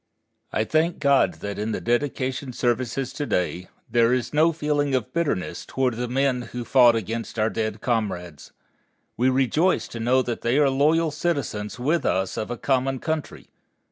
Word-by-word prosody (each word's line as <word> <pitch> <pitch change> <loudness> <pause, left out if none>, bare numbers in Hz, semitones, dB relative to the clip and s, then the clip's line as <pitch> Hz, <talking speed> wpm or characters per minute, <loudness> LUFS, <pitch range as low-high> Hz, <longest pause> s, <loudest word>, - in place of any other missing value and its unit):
I 110 - +1
thank 155 +9 +1
God 140 -2 +3
that 100 0 -4
in 110 +1 -2
the - - -2
dedication 130 +1 -1
services 120 +2 -1
to 145 - -4
day 90 0 -1 0.2
there 115 0 +3
is 125 +2 -1
no 155 +3 +4
feeling 145 -3 0
of 125 -4 -2
bitterness 160 - -1
toward 130 -2 -1
the 120 +2 -3
men 130 0 +1
who 120 -1 -4
fought 120 -3 +6
against 115 +2 -4
our 110 0 +1
dead 110 -1 -3
comrades. 100 - -3 0.6
We 125 +3 +2
rejoice 135 +8 +2
to 115 - -7
know 125 +3 +2
that 120 -2 -4
they 120 +3 +1
are 145 -2 +4
loyal 155 +4 +2
citizens 140 -10 -2
with 150 +7 0
us 95 0 0
of 110 - -4
a 120 - -4
common 135 +1 0
country. 155 +2 -4
125 Hz, 170 wpm, -24 LUFS, 115-140 Hz, 0.6 s, fought